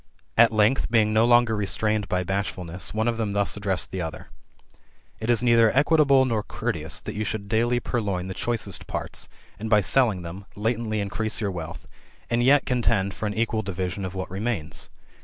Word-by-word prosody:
At 115 0 +6
length, 110 +4 +2
being 110 -2 +3
no 110 +1 +4
longer 120 -2 +4
restrained 105 0 0
by 90 0 0
bashfulness, 90 -2 -3
one 110 +2 -1
of 120 -1 0
them 110 -3 -2
thus 100 0 +1
addressed 100 -3 -2
the 95 - -3
other: 80 -2 -6 0.5
" - - -35
It 110 - -3
is 120 0 +2
oeither 115 -2 +5
equitable, 140 -2 +4
nor 115 -4 0
courteous, 80 -4 -3
that - - -6
you 105 - -2
should 105 -1 -4
daily 120 +3 +1
purloin 100 -7 -2
the 95 - -4
choicest 110 0 -2
parts, - - -4 0.3
and 110 +1 -4
by 105 -2 +5
selling 105 -4 +2
them, 90 +4 -8
latently 110 0 -1
increase 100 +2 -3
your 105 -3 -1
wealth, 85 -2 -7 0.5
and 120 +1 +2
yet 140 +3 +5
contend 115 -6 +1
for 105 +4 -3
an 105 - -4
equal 110 -1 0
division 95 -1 -4
of 95 0 -5
what 95 -1 -5
remains. 95 -6 -2
105 Hz, 190 wpm, -25 LUFS, 95-115 Hz, 0.5 s, At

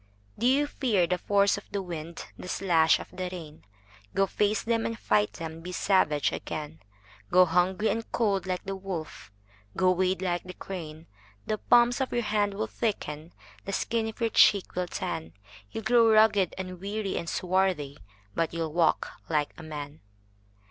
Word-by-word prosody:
DO 240 - +2
you 280 +3 +4
fear 230 -10 +1
the 180 +1 -1
force 200 +1 +3
of - - -21
the 200 - -2
wind, 170 -2 -6
The - - -9
slash 170 -4 +3
of - - -10
the 185 0 -4
rain? 160 -4 -9 0.5
Go 195 - +4
face 210 +2 0
them 230 -1 +1
and 230 - -4
fight 105 - +1
them, 165 0 -7
Be 180 +2 -7
savage 175 -6 +2
again. 155 +1 -5 0.5
Go 185 +1 +6
hungry 180 +5 +2
and 225 +2 -3
cold 200 -5 +1
like 185 -1 -2
the 195 0 -4
wolf, 185 - -6 0.5
Go 185 -1 +4
wade 185 +1 +1
like 175 -1 0
the 180 0 -10
crane:The 155 - -7
palms 240 +1 +4
of 265 - -1
your 240 - 0
hands 205 -1 0
will 110 - -1
thicken, 150 - -3 0.3
The 195 - -4
skin 225 +2 0
of 220 - -7
your 230 -1 0
cheek 200 -2 +5
will 180 0 -2
tan, 165 -3 -4 0.4
You 225 - -5
'll - - -17
grow 230 0 +5
ragged 215 -4 +4
and 185 -1 -6
weary 200 0 -3
and 170 - -3
swarthy, 180 -6 0 0.3
But 165 +5 -1
you 165 - -1
'll 155 -2 -5
walk 170 -1 +2 0.2
like 150 -2 0
a - - -11
man! 150 -1 -7
185 Hz, 180 wpm, -28 LUFS, 160-205 Hz, 0.5 s, Go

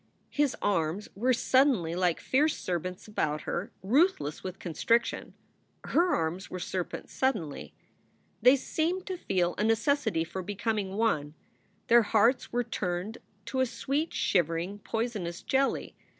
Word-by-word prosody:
His 290 -2 +1
arms 180 0 0
were 245 +6 +1
suddenly 255 - +3
like 180 -1 +1
fierce 295 +4 +2
serpents 180 +2 -4
about 155 -8 -1
her, 180 +4 -3
ruthless 250 - +2
with 185 0 -5
constriction. 230 +8 0 0.5
Her 350 +1 +2
arms 165 +3 -2
were 185 - -5
serpents 180 0 -4
suddenly. 175 - -2 0.7
They 255 +2 +7
seemed 330 +7 -1
to 375 - -3
feel 180 - 0
a - - +2
necessity 225 - +2
for 185 +3 -5
becoming 205 0 -2
one; 155 -10 0 0.5
their 235 0 +6
hearts 225 +4 +2
were 245 +1 +1
turned 185 +1 -3 0.3
to 260 - -3
a 260 - +3
sweet, 275 +6 -2
shivering, 175 +2 0
poisonous 210 -7 -3
jelly. 270 0 0
210 Hz, 135 wpm, -29 LUFS, 175-255 Hz, 0.7 s, They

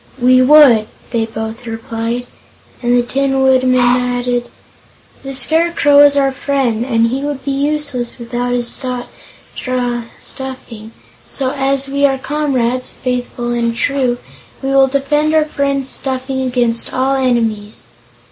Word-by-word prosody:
"We 255 +1 +5
would," 255 -6 +6 0.2
they 225 -2 0
both 220 +2 -6
replied, 230 +1 -4 0.6
and 245 0 +2
the 245 - +2
Tin 270 +2 0
Woodman 255 -1 +3
added: 245 0 0 0.7
"The 270 0 -6
Scarecrow 290 +1 +3
is 285 0 +6
our 275 -1 +3
friend, 265 -4 -1
and 230 -2 +1
he 265 +3 -2
would 285 -2 -4
be 280 - -1
useless 285 -3 -2
without 245 0 -3
his 240 -1 +1
straw 250 0 -4 0.2
stuffing. 255 -5 -9 0.4
So, 265 -2 -2
as 275 0 0
we 280 +1 -2
are 270 -1 -1
comrades, 260 -3 -1
faithful 245 -1 -3
and 235 -1 -1
true, 255 -1 0 0.5
we 270 - -1
will 270 0 +5
defend 295 +3 0
our 310 -1 +4
friend's 280 -2 -1
stuffing 265 0 -2
against 245 -3 0
all 265 +1 0
enemies." 230 -5 -1
255 Hz, 135 wpm, -15 LUFS, 240-275 Hz, 0.7 s, would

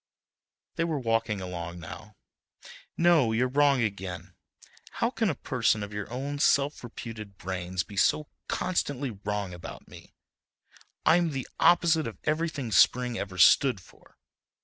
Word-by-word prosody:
They 165 - +1
were 165 -2 -1
walking 115 -4 0
along 85 -1 -6
now. 105 +5 -10 0.8
"No—you're 130 -9 +3
wrong 140 -1 +3
again, 95 -4 -5 0.6
how - - 0
can - - 0
a - - -1
person 110 -1 0
of 100 0 -7
your 105 +1 -5
own 140 +3 -4
self 140 0 +2
reputed 110 -4 -8
brains 90 -1 -3
be 100 +5 -12
so 150 +9 +2 0.2
constantly 145 -7 -1
wrong 100 -2 -4
about 90 - -10
me? - - -15 0.9
I'm 170 0 +4
the 135 -4 -4
opposite 170 -4 +4
of 115 - -7
everything 155 -6 -1
spring 125 +1 +3
ever 95 -2 -5
stood 125 +6 +5
for. 90 - -21
115 Hz, 135 wpm, -28 LUFS, 100-145 Hz, 0.9 s, stood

